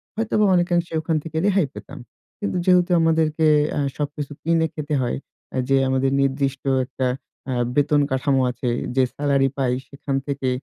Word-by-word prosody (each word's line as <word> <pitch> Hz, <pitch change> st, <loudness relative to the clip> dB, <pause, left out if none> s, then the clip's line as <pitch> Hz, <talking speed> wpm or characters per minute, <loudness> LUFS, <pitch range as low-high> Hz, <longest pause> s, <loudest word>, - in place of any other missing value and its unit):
হয়তোবা 215 Hz, -1 st, +1 dB
অনেকাংশে 175 Hz, -1 st, +1 dB
ওখান 160 Hz, 0 st, -1 dB
থেকে 160 Hz, -1 st, -6 dB
রেহাই 195 Hz, -7 st, +3 dB
পেতাম। 140 Hz, +1 st, -9 dB, 0.4 s
কিন্তু 205 Hz, -3 st, -2 dB
যেহেতু 180 Hz, -1 st, +4 dB
আমাদেরকে 160 Hz, -1 st, +2 dB, 0.3 s
এ্যা -, -, -2 dB, 0.2 s
সবকিছু 145 Hz, 0 st, -4 dB
কিনে 165 Hz, 0 st, +2 dB
খেতে 150 Hz, 0 st, -4 dB
হয়, 120 Hz, -, -1 dB, 0.3 s
এ্যা 130 Hz, -, -2 dB
যে 135 Hz, -, +4 dB
আমাদের 130 Hz, 0 st, +1 dB
নির্দিষ্ট 135 Hz, 0 st, -1 dB, 0.2 s
একটা 130 Hz, -1 st, -2 dB, 0.4 s
এ্যা 125 Hz, -2 st, 0 dB
বেতন 145 Hz, 0 st, +3 dB
কাঠামো 130 Hz, 0 st, +2 dB
আছে, 125 Hz, 0 st, -3 dB, 0.3 s
যে 130 Hz, -, +4 dB
সেলারি 140 Hz, -2 st, +2 dB
পাই 130 Hz, -2 st, +1 dB
এ্যা 130 Hz, -, -3 dB
সেখান 140 Hz, 0 st, -4 dB
থেকে 140 Hz, -2 st, -1 dB
145 Hz, 165 wpm, -22 LUFS, 135-165 Hz, 0.4 s, যেহেতু